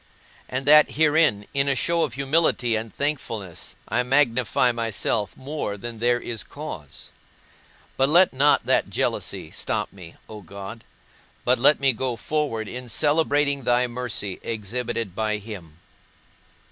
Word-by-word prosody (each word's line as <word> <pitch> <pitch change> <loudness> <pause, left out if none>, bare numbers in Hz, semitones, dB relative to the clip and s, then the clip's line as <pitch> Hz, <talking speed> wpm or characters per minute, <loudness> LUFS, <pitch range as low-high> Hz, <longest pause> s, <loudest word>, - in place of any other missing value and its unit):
and 130 +1 -3
that 150 +1 +6
herein, 150 -9 +3
in 140 0 +1
a 140 - +2
show 170 +5 +1
of 150 -7 0
humility 135 -4 +1
and 110 0 -3
thankfulness, 115 - -4
I 120 - +1
magnify 125 -2 +2
myself 115 -3 -2
more 135 -7 -4
than 115 +2 -7
there 120 +1 +2
is 115 -3 -5
cause? 115 - -9 0.9
But 135 +1 +3
let 175 +2 +5
not 140 +3 +3
that - - +2
jealousy - - -2
stop - - -3
me, 90 -4 -12
O 105 -1 -9
God, 100 +4 -9 0.6
but 125 0 +3
let 145 +4 +5
me 135 -1 +3
go 125 +1 -1
forward 125 -5 -2
in 125 +2 -7
celebrating 145 0 +2
thy 120 +1 +3
mercy 120 -5 -3
exhibited 115 -1 -4
by 110 -1 0
him. 100 -7 -10
120 Hz, 140 wpm, -24 LUFS, 110-140 Hz, 0.9 s, that